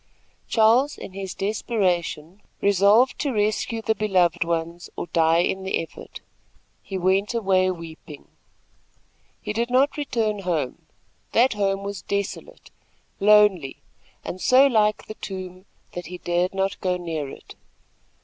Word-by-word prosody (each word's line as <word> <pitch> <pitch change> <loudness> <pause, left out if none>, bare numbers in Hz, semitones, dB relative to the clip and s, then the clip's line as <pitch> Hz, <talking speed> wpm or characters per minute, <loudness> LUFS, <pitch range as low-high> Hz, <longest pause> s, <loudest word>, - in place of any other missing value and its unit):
Charles, 235 +6 +3
in 185 - -9
his 190 -1 -6
desperation, 195 -4 -2 0.2
resolved 200 +6 +4
to 285 - -1
rescue 215 +1 -1
the 220 - +2
beloved 190 -7 +1
ones 170 +1 -3
or - - -4
die 165 0 +3
in 190 +1 -1
the 190 0 -1
effort. 165 - -9 0.6
He 195 - -5
went 190 +5 +1
away 190 -4 +2
weeping. 165 -4 -9 1.1
He - - -4
did 235 +2 -1
not 265 +4 +2
return 225 -7 -1
home. 170 -9 -3 0.5
That 245 +3 +4
home 195 -1 -1
was 200 -2 -5
desolate, 200 +1 -5 0.5
lonely 205 -8 +4 0.4
and 185 - -6
so 260 +2 +6
like 215 -5 +2
the - - -7
tomb, 185 -2 -8 0.2
that 175 -3 -7
he 180 +1 -7
dared 175 +2 -1
not 195 0 -1
go 180 -1 0
near 160 -5 -4
it. - - -12
195 Hz, 135 wpm, -24 LUFS, 175-215 Hz, 1.1 s, so